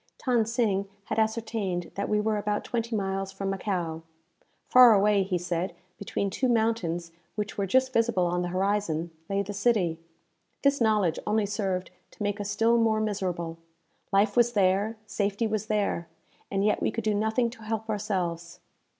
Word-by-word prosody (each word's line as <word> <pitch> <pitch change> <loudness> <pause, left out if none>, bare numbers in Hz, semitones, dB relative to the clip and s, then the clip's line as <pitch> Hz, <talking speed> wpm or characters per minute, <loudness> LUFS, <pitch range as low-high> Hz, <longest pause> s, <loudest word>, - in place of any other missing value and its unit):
Than 240 -4 +2
Sing 215 -4 0 0.2
had - - -1
ascertained 220 -5 -1
that 200 - -3
we 210 - +2
were 215 0 +1
about 210 0 -1
twenty 230 -1 -2
miles 195 -1 -2
from 195 0 -3
Macao. 180 -5 -2 0.7
Far 250 -3 +8
away, 205 0 +4
he 190 -1 0
said, 175 +1 -2 0.2
between 200 0 -2
two 255 +6 0
mountains 220 -8 0 0.2
which 210 -1 -3
were 200 -1 -1
just 260 +5 +2
visible 230 -6 +2
on 175 +1 0
the 175 - -1
horizon, 185 -3 -1 0.2
lay 200 0 +1
the 205 +1 -6
city. 200 -6 +1 0.6
This 280 -1 +3
knowledge 210 -7 +2
only 215 0 +2
served 195 -3 -2 0.2
to - - -7
make 205 0 -1
us 200 - -4
still 230 +2 +3
more 220 -1 +3
miserable. 180 -6 -2 0.5
Life 200 +1 +3
was 240 0 +4
there, 200 +2 +2
safety 205 +1 -1
was 215 0 -2
there, 205 -5 0 0.4
and 195 +1 0
yet 210 - +2
we - - +2
could 230 - -4
do 215 0 +1
nothing 220 +3 +1
to 240 - -13
help 220 0 -3
ourselves! 175 -5 -3
205 Hz, 170 wpm, -27 LUFS, 190-220 Hz, 0.7 s, Far